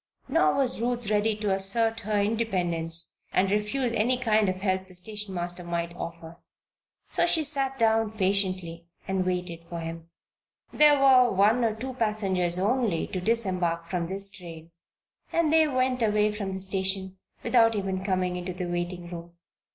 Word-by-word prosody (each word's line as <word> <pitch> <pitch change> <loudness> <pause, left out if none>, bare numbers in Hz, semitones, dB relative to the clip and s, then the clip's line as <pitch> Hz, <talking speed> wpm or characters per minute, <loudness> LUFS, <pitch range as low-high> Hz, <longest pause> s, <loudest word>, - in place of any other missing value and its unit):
Nor 150 0 +2
was 255 -4 0
Ruth 240 -3 -2
ready 210 +1 +2
to 210 -1 -2
assert 225 +4 +2
her 210 -1 -1
independence 180 -7 -1
and 190 +1 +1
refuse 220 +4 -1
any 240 +3 +1
kind 220 -5 +2
of 185 - -1
help 190 0 -2
the 185 - -13
station 205 +1 -5
master 175 0 -3
might 170 0 -3
offer. 170 -1 -8 0.7
So - - +2
she 325 -2 +3
sat 275 -2 0
down 225 -2 +2
patiently 185 -4 0 0.2
and 190 -1 0
waited 180 -2 -3
for 170 - -5
him. 165 0 -7 0.6
There 295 -1 +6
were 260 -2 +6
one 210 +6 +3
or 220 -2 +1
two 260 +4 -6
passengers 195 -7 +1
only 210 -2 0
to 185 - -4
disembark 180 -6 -1
from 175 -2 -1
this 195 +2 0
train 170 -3 -11 0.6
and 325 -2 +1
they 320 -1 +5
went 255 -2 0
away 210 -1 +2
from 200 -2 -4
the 190 - -4
station 190 0 -1 0.2
without 225 -2 +4
even 190 -2 -2
coming 185 -2 -1
into 180 +1 -5
the 180 0 -4
waiting 175 0 -4
room. 170 0 -8
195 Hz, 165 wpm, -26 LUFS, 180-225 Hz, 0.7 s, There